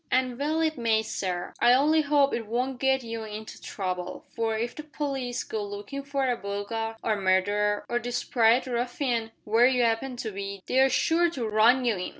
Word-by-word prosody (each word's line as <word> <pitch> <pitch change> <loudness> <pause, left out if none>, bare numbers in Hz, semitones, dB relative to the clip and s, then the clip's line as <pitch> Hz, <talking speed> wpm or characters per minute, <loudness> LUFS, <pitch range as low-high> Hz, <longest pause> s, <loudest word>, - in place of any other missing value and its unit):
"And 255 -1 0
well 310 +3 0
it 315 -4 0
may, 220 -2 +2
sir. 180 -4 -3
I 240 - +6
only 305 +4 +4
'ope 285 -1 +3
it 225 -2 -3
won't 250 +3 -2
get 265 -1 +2
you 230 -1 -5
into 215 0 -8
trouble, 185 -3 -4
for 225 -1 0
if 235 +2 -2
the - - -6
p'leece 275 -5 -4
go 220 -2 -3
lookin' 205 +7 -6
for 275 -1 -1
a 245 - +1
burglar, 215 +2 -4
or 220 - +1
murderer, 205 +2 +1
or 240 - 0
desprit 240 0 +2
ruffian, 245 -1 -1
where 225 +3 +4
you 250 -2 +2
'appen 235 +3 0
to 230 -3 -4
be, 200 -1 -6
they're 265 +1 +4
sure 335 +6 +2
to 255 -9 -4
run 230 +4 +4
you 230 -5 +1
in. 180 - -4
235 Hz, 190 wpm, -27 LUFS, 215-265 Hz, -, I